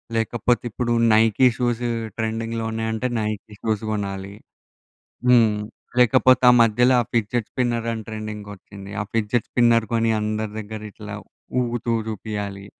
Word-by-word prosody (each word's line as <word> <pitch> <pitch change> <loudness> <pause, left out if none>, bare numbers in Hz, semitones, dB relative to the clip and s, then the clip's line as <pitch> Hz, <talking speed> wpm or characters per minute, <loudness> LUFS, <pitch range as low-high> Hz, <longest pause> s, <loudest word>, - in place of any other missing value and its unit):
లేకపోతే, 115 +1 0
ఇప్పుడు 120 +1 -1 0.2
Nike 115 +3 +5
shoes 120 -1 0 0.3
ట్రెండింగ్‌లో 115 0 -2
ఉన్నాయంటే 110 +2 -2
నైకి 105 0 -4
షూస్ 110 -1 -1
గొనాలి. 100 -1 -4 1.0
హ్మ్. 115 -4 +5 0.4
లేకపోతే 130 +1 +5
ఆ - - +7
మధ్యలో 120 +3 +4
ఆ - - -8
ఫిడ్జెట్ 115 0 0
స్పిన్నర్ 120 -2 -1
అని 110 -1 -4
ట్రెండింగొచ్చింది. 105 -2 -8
ఆ - - 0
ఫిడ్జెట్ 115 +1 0
స్పిన్నర్ 115 -2 +4
కొని 115 0 +2
అందరి 110 0 -2
దగ్గర 110 +1 -7
ఇట్లా 105 -1 -8 0.5
ఊగుతూ 120 -1 -2
జూపియాలి. 105 -2 -5
110 Hz, 125 wpm, -22 LUFS, 105-120 Hz, 1.0 s, ఆ